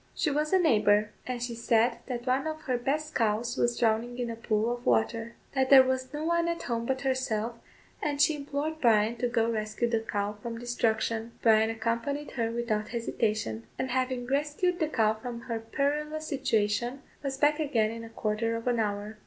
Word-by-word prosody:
She 305 - +1
was 300 +2 0
a 380 - +5
neighbour, 210 - +3 0.2
and 245 -1 -3
she 240 -1 -3
said 235 +1 +2
that 245 -2 -4
one 265 +3 +1
of 310 0 -4
her 255 -4 -1
best 300 +5 -1
cows 230 +1 0
was 240 0 +1
drowning 235 +1 +1
in 240 -2 -2
a - - -5
pool 225 0 0
of 240 - -8
water 225 - +1 0.2
that 265 -1 +1
there 270 -1 +10
was 260 0 -1
no 300 +1 -4
one 340 0 +2
at 340 0 -2
home 235 -1 -2
but 265 0 -1
herself, 255 -4 -1 0.5
and 290 -1 -1
she 305 +1 +4
implored 290 +2 -3
Bryan 225 -1 +4
to 245 - 0
go 230 -2 +2
rescue 215 +1 -1
the 230 -1 +1
cow 210 -2 -3
from 230 0 -5
destruction. 230 -1 -1
Bryan 220 -1 +5
accompanied 230 +6 -2
her 230 -3 -1
without 230 -2 -1
hesitation; 215 - -2
and 260 - -2
having 255 -1 -1
rescued 295 +7 0
the 315 - +2
cow 220 -7 +2
from 235 +2 -7
her 230 -1 -3
perilous 300 +6 -2
situation, 240 -2 0 0.2
was 270 -1 -3
back 295 +2 +3
again 235 -8 +1
in 230 0 -7
a 230 - -9
quarter 225 +1 -1
of 230 - -5
an 240 -2 +2
hour. 210 0 -2
240 Hz, 195 wpm, -29 LUFS, 225-275 Hz, 0.5 s, there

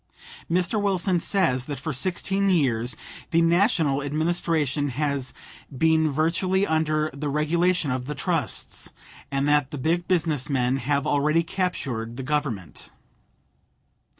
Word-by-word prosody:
Mr. 180 +5 +1
Wilson 190 -2 +2
says 165 -10 +1
that 145 -2 -5
for 155 +2 -4
sixteen 190 +6 +1
years 125 -9 +1 0.3
the 165 - +3
National 165 -4 +3
Administration 150 -1 0
has 140 0 -2 0.5
"been 160 +1 +3
virtually 175 +6 +1
under 155 -1 0
the 145 +1 -3
regulation 160 +2 +1
of 125 0 -3
the 150 - -4
trusts," - - -2 0.4
and 140 0 0
that 145 -2 +3
the 150 - -6
big 170 +6 0
business 160 -6 0
men 130 -1 +1
"have 140 +2 0
already 150 +3 +2
captured 135 -11 -3
the 135 - -4
Government." 130 - -3
150 Hz, 125 wpm, -25 LUFS, 140-170 Hz, 0.5 s, the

